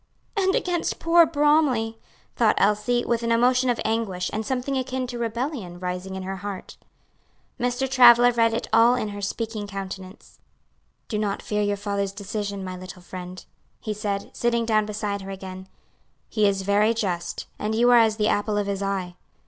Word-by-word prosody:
"And 385 -1 +2
against 350 -2 -1
poor 335 0 +5
Bromly," 290 -7 +2 0.4
thought 225 -3 +3
Elsie, 210 +4 +2
with 235 -1 0
an 230 0 -1
emotion 250 +2 +3
of 240 - 0
anguish, 215 -5 -1
and 220 - -2
something 260 +4 -2
akin 260 0 -2
to 245 -1 -6
rebellion 235 - -3
rising 180 +1 -4
in 190 - -5
her 190 +1 -4
heart. 200 0 -7 0.8
Mr. 245 +2 0
Travilla 245 -2 +7
read 230 -1 +3
it 235 - -3
all 230 +2 +6
in 215 -4 -2
her 205 0 -7
speaking 215 +1 -3
countenance. 195 -1 -8 0.7
"Do 210 - -2
not 205 -2 -2
fear 210 0 -1
your 205 0 0
father's 200 -1 -2
decision, 200 -1 -4
my 185 -1 -5
little 185 0 -10
friend." 180 0 -8 0.3
he 215 - -4
said, 205 -1 -3
sitting 235 -1 +1
down 215 -2 +2
beside 205 -1 -3
her 195 - -8
again, 190 -1 -8 0.6
"he 215 -2 +2
is 195 -1 0
very 205 +3 +3
just, 175 -6 -3
and 215 +1 -1
you 240 +2 +4
are 240 - +8
as 220 -2 +3
the 210 -1 +1
apple 205 0 0
of 205 - 0
his 200 -1 -3
eye. 195 -2 -2
215 Hz, 180 wpm, -24 LUFS, 195-240 Hz, 0.8 s, are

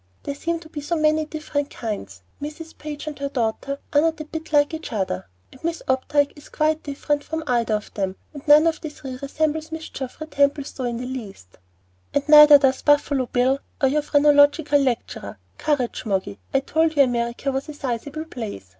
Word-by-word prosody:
"There 285 - -3
seem 335 +4 -2
to 315 - -13
be 300 -2 -6
so 315 +4 -1
many 310 0 +2
different 300 -2 -3
kinds. 100 - -6 0.2
Mrs. 305 +2 -7
Page 300 -1 -7
and 300 -2 -6
her 280 0 -2
daughter 260 +2 -2 0.2
are 290 - +5
not 325 0 +1
a 310 - -5
bit 320 +1 -7
like 290 0 +3
each 320 -3 -6
other, 185 - -2 0.2
and 260 - -17
Miss 335 0 -2
Opdyke 280 +2 +1
is 295 - -15
quite 310 0 +1
different 290 0 -2
from 320 0 -4
either 235 -5 +1
of 210 - -6
them, 190 -2 -2 0.2
and 285 - -8
none 300 +2 +8
of 325 -1 +1
the 310 - -4
three 265 -3 -8
resembles 310 +2 -1
Mrs. 320 0 -7
Geoffrey 265 +4 -6
Templestowe 280 -3 0
in 240 -1 -2
the 250 - -5
least." 210 - -8 0.6
"And 285 0 +1
neither 300 -1 +10
does 270 -2 +2
Buffalo 290 -3 +2
Bill 260 +3 +2 0.2
and 270 -1 +3
your 300 - +2
phrenological 290 0 +4
lecturer. 255 -4 -2 0.2
Courage, 285 -6 -1
Moggy. 195 0 -2
I 270 - +2
told 320 +3 +1
you 285 - +7
America 240 +2 -1
was 270 +3 -3
a - - -5
sizable 285 +4 -4
place. 215 - -7
285 Hz, 195 wpm, -23 LUFS, 255-305 Hz, 0.6 s, neither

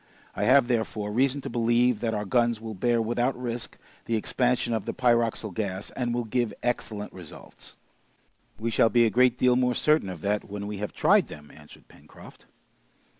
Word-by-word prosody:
I 105 - -1
have, 130 +1 +5
therefore, 110 -3 -2
reason 135 +5 +1
to - - -6
believe 120 0 +2
that 115 -1 -1
our 105 0 -3
guns 120 +2 +1
will 110 0 -7
bear 120 +4 +1
without 120 +3 -1
risk 120 -1 -4 0.3
the 115 - -1
expansion 120 +2 0
of 110 -3 -2
the - - -4
pyroxyle 115 -4 +1
gas, 95 -1 -4
and 120 -2 -3
will 120 0 -1
give 115 -1 -2
excellent 110 -4 -3
results." 90 -5 -12 0.8
"We 115 +2 -3
shall 110 +1 +4
be 120 +2 +4
a 110 - +1
great 125 +1 +3
deal 125 -1 +3
more 125 -1 +1
certain 150 -10 +2
of 90 -4 -7
that 105 +1 -1
when 100 0 -5
we 105 0 -5
have 105 +1 -4
tried - - +3
them!" 75 -1 -12
answered 75 -1 -16
Pencroft. - - -16
115 Hz, 185 wpm, -26 LUFS, 105-125 Hz, 0.8 s, have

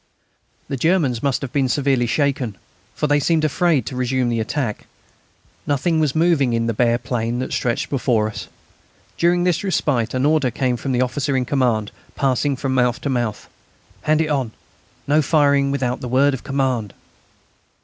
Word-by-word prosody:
The 135 - -3
Germans 150 -6 +1
must 140 -1 0
have 130 - -6
been 135 -3 +1
severely 135 -2 +1
shaken, 130 -5 -1 0.4
for - - -1
they 145 0 +3
seemed 155 +1 +1
afraid 155 -4 +1
to 130 - -5
resume 125 0 0
the 115 -1 -1
attack. 110 +1 -3 0.8
Nothing 155 +3 +1
was 150 -2 +1
moving 160 -7 +2
in 115 0 0
the 115 - 0
bare 120 +1 +2
plain 120 -1 -2
that 130 +1 -3
stretched 120 -2 -1
before 120 -5 +1
us. 100 -2 -7 0.7
During 175 +1 +3
this 180 0 +1
respite 130 - 0
an 130 +2 +1
order 150 -3 +3
came 125 +1 -1
from 135 +3 -4
the 125 -1 +1
officer 135 +2 0
in 125 - 0
command, 120 -6 0 0.2
passing 135 +1 +1
from 130 0 -2
mouth 125 0 +1
to 140 - -2
mouth: 120 -5 -2 0.5
"Hand 155 +1 +2
it 155 - -1
on: 130 -7 -1 0.5
No 150 +2 +3
firing 140 -2 +3
without 130 -2 -1
the 125 - -4
word 135 +3 +3
of 135 - -5
command." 130 -7 -1
130 Hz, 175 wpm, -20 LUFS, 120-145 Hz, 0.8 s, they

